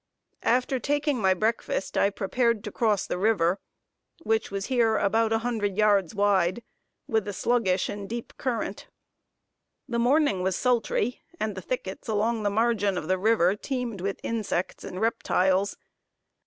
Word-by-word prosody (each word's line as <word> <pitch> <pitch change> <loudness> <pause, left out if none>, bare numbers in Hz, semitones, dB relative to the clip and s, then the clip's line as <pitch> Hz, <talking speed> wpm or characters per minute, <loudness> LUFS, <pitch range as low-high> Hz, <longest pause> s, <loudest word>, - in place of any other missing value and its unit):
After 255 +2 +1
taking 290 +1 0
my 190 -1 +4
breakfast, 220 -1 -1
I 200 - +4
prepared 225 +2 0
to 210 - -5
cross 215 -3 +1
the 180 - -3
river, 190 -3 +2 0.6
which 225 -5 0
was 195 -1 -3
here 230 -4 +2
about 220 +2 +2
a 225 - +3
hundred 205 -5 -1
yards 205 -3 +3
wide, 200 +1 +2 0.4
with 220 -2 0
a 205 - -3
sluggish 195 -4 +1
and 200 -1 -6
deep 235 +1 -5
current. 230 -5 -3 1.0
The 235 -2 -1
morning 255 -4 +3
was 185 0 0
sultry, 245 -1 0 0.2
and 215 -5 -1
the 190 - -7
thickets 190 -2 -5
along 220 +1 0
the 205 - +1
margin 205 -2 +1
of 155 - -4
the 185 0 +1
river 200 -3 +3
teemed 240 -3 -4
with 195 +1 -3
insects 215 -5 -2
and 185 - -6
reptiles. 195 -3 +1
215 Hz, 155 wpm, -26 LUFS, 195-235 Hz, 1.0 s, my